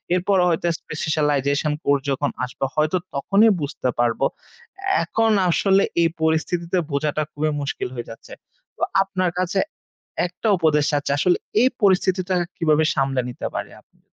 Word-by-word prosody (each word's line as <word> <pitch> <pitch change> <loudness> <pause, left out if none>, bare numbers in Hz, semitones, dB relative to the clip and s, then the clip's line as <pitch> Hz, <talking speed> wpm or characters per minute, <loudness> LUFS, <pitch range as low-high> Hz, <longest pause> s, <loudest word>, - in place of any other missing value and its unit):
এরপর 185 +2 +1
হয়তো 170 +1 0
specialisation 150 -1 0
course 140 -1 +2
যখন 140 +1 0 0.2
আসবে, 125 +2 -4
হয়তো 155 +3 +2 0.2
তখনই 200 +10 +4
বুঝতে 140 -3 -2
পারব। 120 0 +1 0.8
এখন 225 -1 +1 0.2
আসলে 195 +3 +3 0.2
এই 165 - +4
পরিস্থিতিতে 170 +3 0
বোঝাটা 150 +2 0
খুবই 155 +1 -1
মুশকিল 140 - -3
হয়ে 120 - -6
যাচ্ছে। 115 - -12 0.4
তো - - -15 0.2
আপনার 185 -2 -1
কাছে 185 +2 0 0.7
একটা 180 +5 -4
উপদেশ 155 -3 +3
চাচ্ছি 145 -1 -1
আসলে, 180 +4 +3 0.3
এই 255 - +6
পরিস্থিতিটা 185 -1 +2 0.2
কিভাবে 155 -2 +2
সামলে 135 -1 +1
নিতে 125 - -5
পারি - - -4
আমি? - - -35
155 Hz, 140 wpm, -22 LUFS, 145-185 Hz, 0.8 s, এই